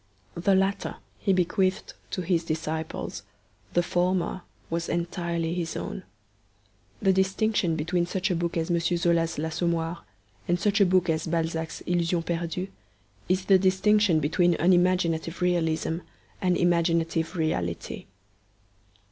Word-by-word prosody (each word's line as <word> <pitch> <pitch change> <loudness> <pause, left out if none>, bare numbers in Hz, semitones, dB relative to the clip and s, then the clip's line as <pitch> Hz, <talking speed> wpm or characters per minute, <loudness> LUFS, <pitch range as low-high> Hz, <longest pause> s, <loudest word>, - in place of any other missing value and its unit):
The 190 +3 +2
latter 195 +1 0 0.2
he 200 - +1
bequeathed 185 +1 +1 0.2
to 185 - -3
his 170 -1 +1
disciples; 160 0 -4 0.5
the 175 - +4
former 180 +1 0 0.3
was 165 0 -2
entirely 170 -1 -2
his 170 -2 -3
own. - - -5 1.0
The 195 - +5
distinction 190 -2 +1
between 170 +3 0
such 190 +2 -1
a - - +1
book 170 0 -1
as 165 +1 -1
M. 170 - +3
Zola's 170 -1 +1
L'Assommoir 165 +2 -1 0.5
and 175 0 +1
such 205 +2 +2
a 195 - +6
book 180 0 +3
as 160 0 0
Balzac's 160 0 -2
Illusions 175 -1 0
Perdues 170 +2 -2 0.6
is 185 0 +1
the 195 -2 +6
distinction 190 -1 +3
between 170 +4 +2
unimaginative 175 -1 +2
realism 165 -2 0 0.4
and 180 -2 +2
imaginative 170 -1 +1
reality. 90 - -2
175 Hz, 125 wpm, -27 LUFS, 165-185 Hz, 1.0 s, a